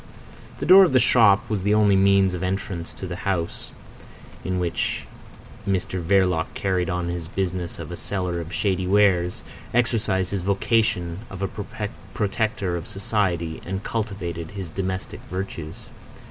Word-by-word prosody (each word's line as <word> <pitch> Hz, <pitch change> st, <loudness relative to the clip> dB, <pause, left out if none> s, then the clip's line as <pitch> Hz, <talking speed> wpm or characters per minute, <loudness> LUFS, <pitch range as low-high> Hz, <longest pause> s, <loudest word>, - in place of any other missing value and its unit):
The -, -, -3 dB
door 190 Hz, +3 st, +9 dB
of 170 Hz, -7 st, +2 dB
the 130 Hz, -, +6 dB
shop 110 Hz, -5 st, +5 dB
was 105 Hz, -3 st, -1 dB
the 105 Hz, +2 st, +2 dB
only 105 Hz, -2 st, +5 dB
means 95 Hz, -1 st, +4 dB
of 90 Hz, -, -4 dB
entrance 95 Hz, -2 st, -3 dB
to -, -, -7 dB
the 90 Hz, -1 st, -5 dB
house 90 Hz, -4 st, -2 dB, 0.7 s
in 95 Hz, 0 st, -1 dB
which 85 Hz, -2 st, -1 dB, 0.6 s
Mr 95 Hz, -1 st, -1 dB
Verloc 90 Hz, -2 st, +2 dB
carried 95 Hz, -2 st, 0 dB
on 90 Hz, -1 st, -1 dB
his 85 Hz, -2 st, -4 dB
business 90 Hz, -1 st, -3 dB
of -, -, -7 dB
a -, -, -4 dB
seller 90 Hz, -2 st, -2 dB
of 85 Hz, +1 st, -8 dB
shady 95 Hz, -3 st, 0 dB
wares, 95 Hz, -3 st, +3 dB, 0.3 s
exercised 110 Hz, -6 st, +1 dB
his 100 Hz, -2 st, -1 dB
vocation 100 Hz, -3 st, +1 dB
of 95 Hz, 0 st, -6 dB
a 105 Hz, +2 st, -4 dB, 0.3 s
protector 105 Hz, -3 st, 0 dB
of 85 Hz, 0 st, -5 dB
society, 95 Hz, -5 st, -1 dB
and 95 Hz, +2 st, -4 dB
cultivated 95 Hz, -7 st, -3 dB
his 95 Hz, -5 st, -7 dB
domestic 95 Hz, +1 st, -4 dB
virtues. 90 Hz, -4 st, -5 dB
95 Hz, 150 wpm, -24 LUFS, 90-100 Hz, 0.7 s, door